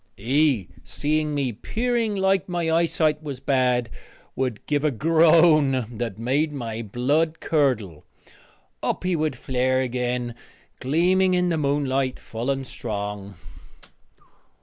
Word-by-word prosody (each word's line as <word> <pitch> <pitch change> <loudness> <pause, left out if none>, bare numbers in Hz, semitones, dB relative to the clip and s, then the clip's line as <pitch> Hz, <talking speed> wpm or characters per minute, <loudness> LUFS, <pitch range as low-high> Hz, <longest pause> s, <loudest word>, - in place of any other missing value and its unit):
He, 130 - +1 0.2
seeing 150 0 -1
me 135 -3 0
peering 230 - -1
like 190 0 +1
my 170 -2 -1
eyesight 160 -2 +1
was 140 -4 -6
bad, 125 -3 +1 0.5
would 130 -5 -3
give 145 -1 0
a 155 - +3
groan 155 -2 +4
that 115 -3 -4
made 135 +7 0
my 115 -5 -5
blood 145 +9 0
curdle. 120 - 0 0.8
Up - - -2
he 180 -1 +1
would 155 -3 -1
flare 130 +1 0
again, 125 -1 -2 0.5
gleaming 180 +7 +2
in 180 0 +1
the 170 - +1
moonlight 135 -2 0
full 115 +3 -5
and 135 -1 -1
strong. 105 -4 -5
140 Hz, 125 wpm, -24 LUFS, 125-160 Hz, 0.8 s, groan